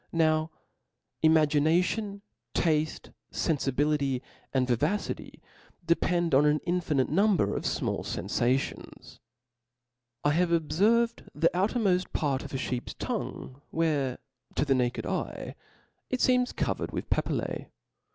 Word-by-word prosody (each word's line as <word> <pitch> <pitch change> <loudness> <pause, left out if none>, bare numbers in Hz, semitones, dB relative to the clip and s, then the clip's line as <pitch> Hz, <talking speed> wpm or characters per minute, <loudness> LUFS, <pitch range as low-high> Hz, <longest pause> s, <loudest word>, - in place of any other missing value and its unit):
Now 155 -1 +2 0.7
imagination, 160 +7 +3 0.3
tafte, 155 -2 0 0.2
fenfibility, 140 -3 0 0.3
and 130 -2 +1
vivacity, 150 - -1 0.5
depend 170 -1 +1
on 135 +2 +6
an 150 +1 +3
infinite 165 -7 +1
number 185 - +3
of - - -3
fmall - - -1
fenfations. 120 +9 -2 1.0
I 145 - +3
have 175 +3 +2
obferved 210 +9 +2
the 165 +3 +3
outermofl: 190 -1 +1
part 140 -3 0
of - - -8
a 135 - -2
Iheep's 125 -1 -3
tongue, 130 +2 -5
where 150 -6 0 0.4
to - - +1
the 140 - +3
naked 125 -2 0
eye - - -3 0.6
it 255 - -1
feems 250 -1 +3
.covered - - -2
with - - -4
papilJaB. - - -1
155 Hz, 110 wpm, -28 LUFS, 135-180 Hz, 1.0 s, on